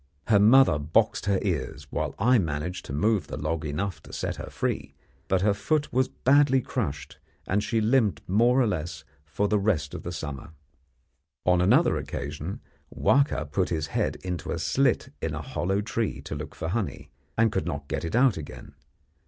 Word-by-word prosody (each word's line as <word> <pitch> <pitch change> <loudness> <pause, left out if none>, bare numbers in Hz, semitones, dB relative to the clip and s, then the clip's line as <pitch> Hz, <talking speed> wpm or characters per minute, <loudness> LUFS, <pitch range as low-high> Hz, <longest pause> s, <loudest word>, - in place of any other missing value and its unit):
Her 105 -3 +6
mother 110 - +6
boxed 105 +10 +1
her 100 -1 +3
ears, 75 -6 -2
while - - -2
I 120 +4 +4
managed 80 +1 -3
to - - -8
move 90 +3 +1
the - - -6
log 80 +2 -2
enough 80 +2 -3
to - - -14
set - - -3
her - - -7
free; - - -3 0.3
but 95 -1 +2
her 105 0 +4
foot 145 +9 -1
was 130 +1 +3
badly 135 +1 +3
crushed, 75 - -4 0.3
and 105 +2 0
she 115 +1 0
limped 110 -2 +2
more 120 +7 +4
or 130 - +4
less 85 -6 -3 0.2
for 80 +7 -1
the 105 0 +2
rest 90 -8 0
of - - -5
the 85 - -5
summer. 75 -1 -6 0.9
On 90 -1 +4
another 125 - +4
occasion 75 +6 -5 0.3
Wahka 140 - +2
put 95 +2 0
his 80 -3 -1
head - - 0
into 90 -2 -4
a - - -1
slit - - +1
in - - -2
a - - -4
hollow 95 +3 -1
tree 110 -6 -2
to 75 - -7
look 75 0 -6
for 80 - -4
honey, 105 +1 -3 0.3
and 115 -1 +4
could - - -1
not 70 0 -4
get - - -3
it 85 +6 -3
out 125 -5 +4
again. 80 - -9
95 Hz, 185 wpm, -26 LUFS, 75-115 Hz, 0.9 s, Her